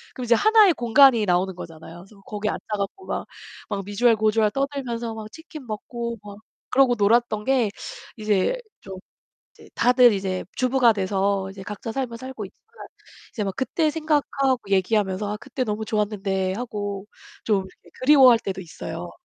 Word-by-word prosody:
그럼 255 Hz, -, -5 dB
이제 235 Hz, -, +4 dB
하나의 430 Hz, -, +5 dB
공간이 240 Hz, -1 st, +5 dB
나오는 185 Hz, 0 st, +1 dB
거잖아요. 165 Hz, -1 st, -10 dB
그래서 205 Hz, -1 st, -19 dB
거기 210 Hz, +1 st, -4 dB
앉아 -, -, -3 dB, 0.2 s
갖고 200 Hz, -, -5 dB
막, -, -, -4 dB, 0.4 s
막 200 Hz, -2 st, -3 dB
미주알 225 Hz, +3 st, +3 dB
고주알 215 Hz, 0 st, +2 dB
떠들면서 255 Hz, -5 st, -3 dB
막 215 Hz, -1 st, -8 dB
치킨 320 Hz, -4 st, -11 dB
먹고 235 Hz, +2 st, -5 dB
막 205 Hz, -1 st, -10 dB, 0.3 s
그러고 260 Hz, -2 st, +4 dB
놀았던 215 Hz, +1 st, +2 dB
게 260 Hz, -5 st, +2 dB, 0.5 s
이제 215 Hz, -, +1 dB, 0.2 s
좀 190 Hz, -1 st, -9 dB, 0.6 s
이제 -, -, -17 dB
다들 245 Hz, -1 st, +5 dB
이제 190 Hz, -1 st, -3 dB
주부가 255 Hz, -2 st, +3 dB
돼서 195 Hz, 0 st, 0 dB
이제 195 Hz, -, -11 dB
각자 210 Hz, +3 st, -6 dB
삶을 245 Hz, -2 st, -4 dB
살고 260 Hz, -4 st, -7 dB
있지만 445 Hz, -, -15 dB, 0.5 s
이제 215 Hz, -, -2 dB
막 195 Hz, -, -3 dB
그때 310 Hz, +4 st, 0 dB
생각하고 290 Hz, -4 st, 0 dB
얘기하면서 200 Hz, +1 st, +1 dB
"아 -, -, -4 dB
그때 255 Hz, -, -4 dB
너무 215 Hz, +1 st, -3 dB
좋았는데." 200 Hz, -3 st, -1 dB
하고 205 Hz, -3 st, -5 dB, 0.4 s
좀 195 Hz, -4 st, +1 dB, 0.3 s
그리워할 260 Hz, -4 st, +7 dB
때도 195 Hz, -3 st, -5 dB
있어요. 170 Hz, 0 st, -7 dB
220 Hz, 345 characters per minute, -23 LUFS, 200-255 Hz, 0.6 s, 그리워할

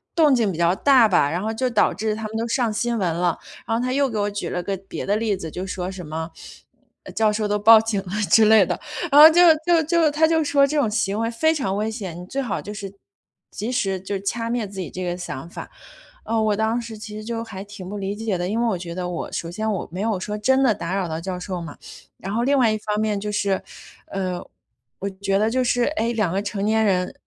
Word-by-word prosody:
动 305 Hz, -5 st, +5 dB
静 225 Hz, -5 st, +1 dB
比 165 Hz, -, -6 dB
较 170 Hz, +1 st, +3 dB
大 260 Hz, -1 st, +5 dB
吧， 145 Hz, -6 st, +3 dB
然 175 Hz, -, -2 dB
后 220 Hz, +2 st, -2 dB
就 255 Hz, +3 st, -1 dB
导 235 Hz, -, +3 dB
致 215 Hz, 0 st, -2 dB
他 220 Hz, 0 st, -5 dB
们 220 Hz, +1 st, -5 dB
都 230 Hz, -, -2 dB
上 235 Hz, -1 st, 0 dB
新 235 Hz, +2 st, -1 dB
闻 180 Hz, -6 st, 0 dB
了。 175 Hz, -1 st, 0 dB, 0.3 s
然 225 Hz, -, 0 dB
后 240 Hz, -, -1 dB
她 255 Hz, 0 st, -1 dB
又 275 Hz, 0 st, +2 dB
给 225 Hz, -, -4 dB
我 205 Hz, 0 st, 0 dB
举 200 Hz, -4 st, -4 dB
了 180 Hz, -, -2 dB
个 195 Hz, +2 st, -2 dB
别 -, -, -5 dB
的 205 Hz, -, +1 dB
例 215 Hz, -2 st, 0 dB
子， 165 Hz, -3 st, -6 dB
就 180 Hz, +4 st, -5 dB
说 185 Hz, -1 st, -4 dB
什 185 Hz, -2 st, -8 dB
么， 160 Hz, +2 st, -5 dB, 0.7 s
呃， -, -, -10 dB
教 215 Hz, -1 st, +2 dB
授 210 Hz, 0 st, -1 dB
都 210 Hz, 0 st, +1 dB
报 220 Hz, +2 st, +8 dB
警 225 Hz, -2 st, -1 dB
了 185 Hz, -2 st, -10 dB, 0.2 s
之 225 Hz, -, +7 dB
类 215 Hz, -1 st, +7 dB
的， -, -, -3 dB, 0.3 s
然 285 Hz, -, +7 dB
后 310 Hz, -, +13 dB
就 340 Hz, +2 st, +4 dB, 0.2 s
就 340 Hz, -2 st, +4 dB
就 325 Hz, -1 st, +2 dB
她 315 Hz, +2 st, +3 dB
就 320 Hz, -1 st, +2 dB
说 285 Hz, -1 st, +4 dB
这 300 Hz, +2 st, -2 dB
种 270 Hz, -7 st, +2 dB
行 210 Hz, -1 st, -1 dB
为 230 Hz, 0 st, 0 dB
非 315 Hz, +7 st, +2 dB
常 260 Hz, -11 st, -2 dB
危 215 Hz, +1 st, -1 dB
险， 190 Hz, -7 st, -6 dB
你 180 Hz, -, -8 dB
最 275 Hz, +7 st, -2 dB
好 220 Hz, -, -3 dB
就 205 Hz, -, -8 dB
是， 200 Hz, -2 st, -7 dB, 0.6 s
及 220 Hz, +5 st, -4 dB
时 195 Hz, -7 st, -1 dB
就 195 Hz, +1 st, -4 dB
掐 230 Hz, +4 st, -3 dB
灭 235 Hz, -3 st, -1 dB
自 195 Hz, 0 st, -9 dB
己 180 Hz, -, -4 dB
这 185 Hz, -, -5 dB
个 175 Hz, -1 st, -2 dB
想 170 Hz, -3 st, -7 dB
法。 -, -, -8 dB, 0.5 s
啊， 225 Hz, 0 st, -1 dB
我 215 Hz, -1 st, +2 dB
当 220 Hz, +3 st, 0 dB
时 230 Hz, -2 st, -8 dB
其 210 Hz, 0 st, -9 dB
实 215 Hz, -, -7 dB
就 230 Hz, 0 st, -3 dB
还 195 Hz, -4 st, -8 dB
挺 200 Hz, -2 st, -10 dB
不 205 Hz, -, -5 dB
理 200 Hz, 0 st, -3 dB
解 215 Hz, -3 st, -2 dB
的， 175 Hz, -, -2 dB
因 215 Hz, +4 st, -1 dB
为 -, -, +1 dB
我 210 Hz, -5 st, 0 dB
觉 170 Hz, -1 st, -7 dB
得 180 Hz, -1 st, -3 dB
我 175 Hz, -, -5 dB
首 170 Hz, -, -4 dB
先 215 Hz, +4 st, -2 dB
我 195 Hz, -, -4 dB
没 180 Hz, -, -6 dB
有 215 Hz, -3 st, 0 dB
说 210 Hz, +3 st, -4 dB
真 265 Hz, +5 st, +2 dB
的 245 Hz, -5 st, +4 dB
打 175 Hz, +2 st, -4 dB
扰 190 Hz, -2 st, -1 dB
到 160 Hz, 0 st, -4 dB
教 180 Hz, +1 st, -5 dB
授 180 Hz, 0 st, -4 dB
嘛， 165 Hz, -, -9 dB, 0.4 s
然 195 Hz, -, -6 dB
后 235 Hz, +2 st, 0 dB
另 280 Hz, +2 st, +2 dB
外 240 Hz, -4 st, +4 dB
一 215 Hz, -, 0 dB
方 210 Hz, 0 st, -3 dB
面 215 Hz, -2 st, 0 dB
就 210 Hz, +1 st, -4 dB
是， 200 Hz, -2 st, 0 dB, 0.5 s
呃， 185 Hz, -2 st, -3 dB, 0.6 s
我 200 Hz, -, -3 dB
觉 195 Hz, 0 st, -1 dB
得 215 Hz, +2 st, +2 dB
就 255 Hz, +2 st, +1 dB
是， 245 Hz, 0 st, +1 dB
诶， 235 Hz, -2 st, 0 dB
2 210 Hz, -7 st, 0 dB
个 195 Hz, +2 st, 0 dB
成 205 Hz, -1 st, -4 dB
年 220 Hz, +1 st, +2 dB
人， 180 Hz, -3 st, +1 dB
210 Hz, 285 characters per minute, -22 LUFS, 190-230 Hz, 0.7 s, 后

